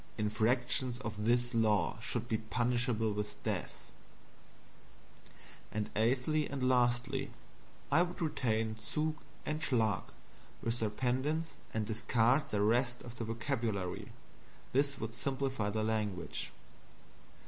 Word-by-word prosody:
Infractions 120 +3 +2
of 105 -4 -4
this 120 +1 +3
law 110 -1 +2
should 120 0 -3
be 110 -2 0
punishable 120 -1 +1
with 105 0 -3
death. - - -3 1.8
And 105 0 -2
eighthly, 135 +7 +2
and 135 -2 0
last, 125 0 +3 0.8
I 150 +5 +6
would 180 0 -1
retain 115 -9 0
ZUG 155 +7 -1 0.3
and 155 +1 -1
SCHLAG, 110 -9 +2 0.6
with 115 +1 0
their 110 - +1
pendants, 130 +8 0 0.2
and 110 -1 -1
discard 115 +6 +2
the 105 -1 +1
rest 120 +3 +2
of 120 0 -9
the 115 - -2
vocabulary. 115 -5 -2 0.6
This 140 +1 +2
would 110 +1 -4
simplify 135 -4 -1
the 110 +1 0
language. 105 -5 -1
120 Hz, 115 wpm, -34 LUFS, 110-130 Hz, 1.8 s, I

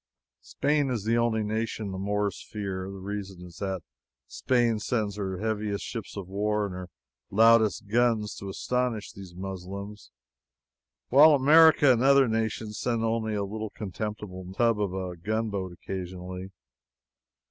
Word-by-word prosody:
Spain 145 -1 0
is 120 -6 -2
the 115 +2 +1
only 115 -2 +1
nation 110 -1 -2
the 95 - -5
Moors 105 +1 -1
fear. 95 -3 -4
The 100 - -8
reason 95 -2 -6
is 85 -1 -13
that 95 -4 -3 0.4
Spain 120 - +1
sends 105 -2 -1
her 95 -2 -3
heaviest 105 0 -2
ships 115 -3 -6
of 95 -3 -5
war 105 +2 0
and 100 - -5
her 90 0 -7 0.4
loudest 110 0 +4
guns 110 -1 +2
to 100 - -6
astonish 125 +1 -2
these 95 -3 -11
Muslims, 95 +2 -7 1.0
while 150 +4 +8
America 150 0 +6
and 120 - 0
other 135 0 +6
nations 110 -1 -2
send 115 -2 0
only 110 -1 0
a 100 - -1
little 110 +2 -4
contemptible 100 -2 -6
tub 115 -2 +2
of 100 -3 0
a 95 -1 -4
gunboat 100 0 -2
occasionally. 90 +1 -6
105 Hz, 145 wpm, -27 LUFS, 95-115 Hz, 1.0 s, while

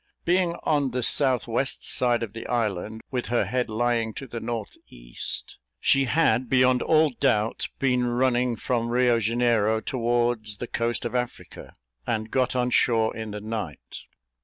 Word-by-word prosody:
Being 175 -1 +2
on 145 -3 +1
the 125 0 -3
south 130 -2 +3
west 125 +3 -1
side 120 -2 +2
of 110 - -6
the 115 - -7
island, 110 -2 -2
with 125 -2 -2
her 120 - +1
head 125 -2 -1
lying 115 0 0
to 140 - -6
the 120 -2 -6
north 115 -2 -5
east, - - -4 0.2
she 135 0 +3
had, 130 -4 +2
beyond 130 0 +3
all 155 -1 +3
doubt, 115 -4 0
been 125 -2 +1
running 125 0 +1
from 115 +1 -2
Rio 120 -1 +3
Janeiro 115 -1 +1
towards 120 -4 0
the 120 - -5
coast 120 0 -1
of 120 - -3
Africa, 125 -1 -5 0.3
and 110 -1 -2
got 130 -1 0
on 125 0 0
shore 115 -2 +2
in 110 -1 -5
the 105 0 -6
night. 105 - -6
120 Hz, 160 wpm, -25 LUFS, 110-125 Hz, 0.3 s, south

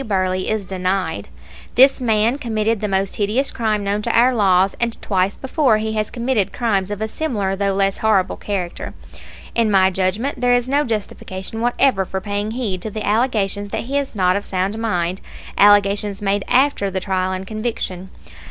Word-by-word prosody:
Burley 185 -4 -1
is 215 -2 -1
denied. 185 - -2 0.5
This 265 +1 +6
man 225 +2 +2
committed 220 -3 -1
the 210 - 0
most 195 0 -1
hideous 220 +7 0
crime 215 -3 -1
known 200 +1 -1
to 235 - -1
our 250 +2 +5
laws, 195 -4 +3
and 235 -1 -1
twice 190 0 0
before 265 -4 +2
he 220 0 -2
has 215 -1 -1
committed 235 -5 -1
crimes 200 -5 0
of 205 0 -5
a - - -1
similar, 215 -8 -2
though 200 0 0
less 195 0 +1
horrible, 205 -4 +2
character. 185 -4 -4 0.6
In 230 -2 +2
my 190 -2 +4
judgment 200 +9 -1
there 245 0 +3
is 245 0 +1
no 285 +3 +2
justification 210 -1 -4
whatever 240 -3 +2
for 190 +1 -4
paying 205 +1 -3
heed 220 -6 -3
to 220 - -4
the 215 0 -5
allegations 205 -3 0
that - - -3
he 265 +4 -5
is 275 -5 -5
not 185 -2 +2
of 200 - -2
sound 190 +2 -2
mind, 185 -5 -1 0.3
allegations 205 0 +4
made 200 -1 0
after 255 -5 +2
the 190 0 -2
trial 185 -1 -1
and 185 0 -4
conviction. 215 -4 -4
205 Hz, 180 wpm, -20 LUFS, 190-230 Hz, 0.6 s, This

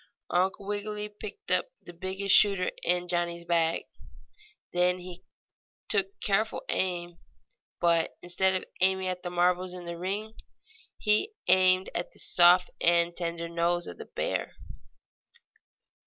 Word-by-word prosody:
Uncle 190 +2 0
Wiggily 210 +1 -3
picked 210 - -9
out - - +3
the 175 - -12
biggest 190 +2 -1
shooter 195 -3 +4
in 180 0 0
Johnnie's 170 -1 -2
bag. 165 -1 +1 0.9
Then 180 +1 +2
he 180 0 -10 0.7
took 195 -2 +1
careful 215 +2 0
aim, 175 -2 -2 0.6
but, 170 -1 +2
instead 185 +2 +1
of 185 - -2 0.2
aiming 190 0 +2
at 180 -1 -4
the 180 - -4
marbles 180 +1 +1
in 180 -1 -8
the 170 0 -6
ring 205 +4 -3 0.6
he 215 - +2
aimed 185 0 +4
at 175 - -4
the - - -14
soft 180 +1 +5
and 170 0 +3
tender 170 -1 -3
nose 170 +1 0
of 85 - -8
the - - -7
bear. - - -3
180 Hz, 135 wpm, -28 LUFS, 175-190 Hz, 0.9 s, soft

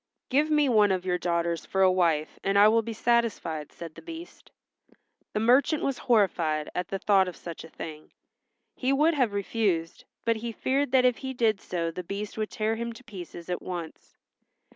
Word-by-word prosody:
"Give 290 +4 +2
me 300 -2 +3
one 210 -5 +4
of 185 -1 -1
your 180 -1 0
daughters 170 -1 -1
for 190 0 +1
a 185 - +6
wife 165 -4 +1
and 195 +1 +1
I 205 +1 +8
will 225 +1 +4
be 230 +1 -6
satisfied," 225 -10 0
said 165 -2 -9
the - - -12
Beast. 335 +1 -10 0.8
The 210 - 0
merchant 265 +7 +3
was 275 -2 -1
horrified 170 -9 +1
at 180 - -2
the 195 - -3
thought 195 -1 +3
of 180 - -6
such 170 -2 -8
a 160 - -11
thing. 155 -1 -9 0.6
He 260 +1 -1
would 300 +4 +4
have 255 -7 +2
refused, 200 -5 -1 0.2
but 230 -1 +2
he 230 +1 -4
feared 270 +3 0
that 255 -1 +5
if 250 -2 +3
he 265 -1 -5
did 220 -4 +2
so 170 -2 -2
the 180 +2 -6
Beast 200 +4 -5
would 215 -1 -2
tear 220 +1 -1
him 235 0 -4
to 230 - -14
pieces 180 -6 -9
at 180 -1 -3
once. 175 -3 -7
205 Hz, 200 wpm, -27 LUFS, 175-240 Hz, 0.8 s, I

